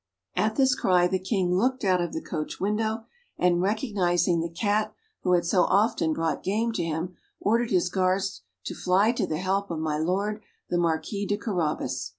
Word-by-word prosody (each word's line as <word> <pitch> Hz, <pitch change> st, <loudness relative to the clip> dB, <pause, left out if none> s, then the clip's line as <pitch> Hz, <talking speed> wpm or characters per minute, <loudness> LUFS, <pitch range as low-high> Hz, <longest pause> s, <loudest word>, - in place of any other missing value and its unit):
At 220 Hz, +1 st, +1 dB
this 265 Hz, -2 st, +4 dB
cry, 180 Hz, -8 st, +3 dB
the 190 Hz, +1 st, 0 dB
King 185 Hz, -2 st, 0 dB
looked 255 Hz, +6 st, +1 dB
out 185 Hz, -2 st, +3 dB
of 175 Hz, -, -2 dB
the -, -, -4 dB
coach 155 Hz, -3 st, -4 dB
window, 220 Hz, +3 st, -1 dB, 0.3 s
and 175 Hz, -1 st, +3 dB
recognising 185 Hz, -5 st, +1 dB
the 170 Hz, -, -3 dB
cat 205 Hz, +5 st, 0 dB, 0.3 s
who 180 Hz, -, +2 dB
had 175 Hz, -1 st, +3 dB
so 180 Hz, +2 st, +3 dB
often 195 Hz, -5 st, +2 dB
brought 160 Hz, -2 st, -1 dB
game 220 Hz, +4 st, 0 dB
to 225 Hz, -, -2 dB
him, 165 Hz, +2 st, -3 dB, 0.2 s
ordered 230 Hz, +2 st, +1 dB
his 180 Hz, -2 st, +2 dB
guards 190 Hz, -, 0 dB, 0.2 s
to -, -, -4 dB
fly 190 Hz, +5 st, +3 dB
to 240 Hz, -, -1 dB
the 155 Hz, -, -2 dB
help 195 Hz, +3 st, -1 dB
of 165 Hz, -, -3 dB
my 155 Hz, -1 st, -1 dB
Lord 200 Hz, +6 st, -1 dB, 0.3 s
the 175 Hz, -, +2 dB
Marquis 175 Hz, +5 st, -1 dB
de 205 Hz, -, 0 dB
Carabas. 155 Hz, -, -2 dB
185 Hz, 185 wpm, -26 LUFS, 175-210 Hz, 0.3 s, this